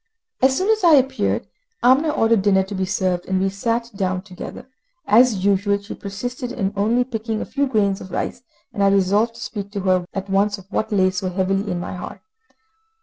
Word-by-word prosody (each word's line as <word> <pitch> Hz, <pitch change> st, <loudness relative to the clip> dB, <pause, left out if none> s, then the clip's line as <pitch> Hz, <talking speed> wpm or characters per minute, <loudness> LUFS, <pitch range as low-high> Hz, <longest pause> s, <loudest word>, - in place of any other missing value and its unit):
As 265 Hz, +1 st, +4 dB
soon 390 Hz, +4 st, +2 dB
as 435 Hz, -2 st, 0 dB
I 335 Hz, -3 st, +7 dB
appeared, 265 Hz, -1 st, +1 dB, 0.4 s
Amina 265 Hz, +6 st, +5 dB
ordered 225 Hz, -7 st, +2 dB
dinner 190 Hz, -1 st, +3 dB
to 195 Hz, +2 st, -8 dB
be 190 Hz, -1 st, -1 dB
served, 185 Hz, -3 st, -1 dB
and 190 Hz, 0 st, 0 dB
we 195 Hz, +1 st, +1 dB
sat 230 Hz, +4 st, -2 dB
down 185 Hz, -2 st, -1 dB
together. 190 Hz, +5 st, -9 dB, 0.4 s
As 220 Hz, -4 st, +4 dB
usual, 200 Hz, 0 st, +2 dB
she 200 Hz, +2 st, -9 dB
persisted 245 Hz, +5 st, -5 dB
in 200 Hz, -5 st, -2 dB
only 225 Hz, +5 st, +2 dB
picking 225 Hz, -3 st, -4 dB
a -, -, -3 dB
few 280 Hz, 0 st, -1 dB
grains 200 Hz, -6 st, +1 dB
of 185 Hz, -, -9 dB
rice, 240 Hz, -, -3 dB, 0.3 s
and 200 Hz, -, -3 dB
I 200 Hz, -, +5 dB
resolved 200 Hz, +4 st, +2 dB
to 230 Hz, -, -11 dB
speak 200 Hz, -4 st, -5 dB
to 200 Hz, -, -3 dB
her 185 Hz, -2 st, +1 dB
at 195 Hz, 0 st, -3 dB
once 200 Hz, +2 st, +1 dB
of 195 Hz, -, -14 dB
what 220 Hz, +1 st, -1 dB
lay 190 Hz, -2 st, +3 dB
so 185 Hz, 0 st, -3 dB
heavily 195 Hz, +2 st, -1 dB
on 175 Hz, -, -2 dB
my 175 Hz, -, -5 dB
heart. 180 Hz, -, -8 dB
200 Hz, 205 wpm, -21 LUFS, 190-235 Hz, 0.4 s, I